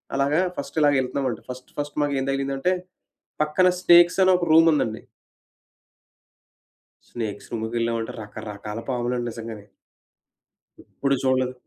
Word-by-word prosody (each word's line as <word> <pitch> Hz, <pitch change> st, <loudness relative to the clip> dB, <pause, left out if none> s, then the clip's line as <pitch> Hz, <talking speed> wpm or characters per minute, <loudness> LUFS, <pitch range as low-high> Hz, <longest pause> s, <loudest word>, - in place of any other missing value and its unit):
అలాగా 140 Hz, +4 st, +2 dB, 0.2 s
first 140 Hz, +2 st, -6 dB
ఇలాగెళ్తున్నామండి. 135 Hz, -3 st, +1 dB
First, 125 Hz, 0 st, -9 dB
first 145 Hz, 0 st, -4 dB
మాకేం 140 Hz, -2 st, -1 dB
తగిలిందంటే 135 Hz, +4 st, 0 dB, 0.7 s
పక్కన 155 Hz, +5 st, +3 dB
స్నేక్స్ 175 Hz, 0 st, +6 dB
అని 185 Hz, -, +5 dB
ఒక 180 Hz, -, -2 dB
రూమ్ 165 Hz, +1 st, +7 dB
ఉందండి. 115 Hz, -7 st, -1 dB, 2.2 s
స్నేక్స్ 110 Hz, -4 st, -5 dB
రూమ్‌లోకెళ్ళామంటే 115 Hz, 0 st, -2 dB
రకరకాల 105 Hz, 0 st, -7 dB
పాములండి 120 Hz, -1 st, -1 dB
నిజంగానే. 110 Hz, -2 st, -8 dB, 1.2 s
ఎప్పుడు 140 Hz, 0 st, -1 dB
చూడలేదు. 130 Hz, -1 st, +1 dB
130 Hz, 105 wpm, -24 LUFS, 115-145 Hz, 2.2 s, రూమ్